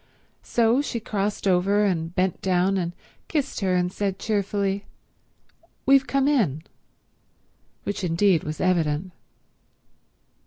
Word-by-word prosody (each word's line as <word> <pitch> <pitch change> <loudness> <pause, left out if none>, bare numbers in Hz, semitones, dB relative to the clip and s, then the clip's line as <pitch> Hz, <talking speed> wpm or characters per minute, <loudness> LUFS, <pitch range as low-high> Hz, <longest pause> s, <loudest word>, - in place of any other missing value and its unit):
So 235 +3 +2
she 245 -5 -3
crossed 205 -1 -2
over 195 +3 +3
and 170 -3 -1
bent 185 -1 0
down 185 +1 +2
and 175 -2 -2 0.3
kissed 290 -3 -2
her 190 -3 +1
and 180 0 0
said 195 -2 -2
cheerfully, 200 -2 -1 1.0
"We've 275 0 +5
come 275 0 +1
in—" 195 - +1 1.2
which 205 -1 -4
indeed 175 0 +2
was 155 0 -5
evident. 170 -1 0
195 Hz, 115 wpm, -24 LUFS, 180-210 Hz, 1.2 s, We've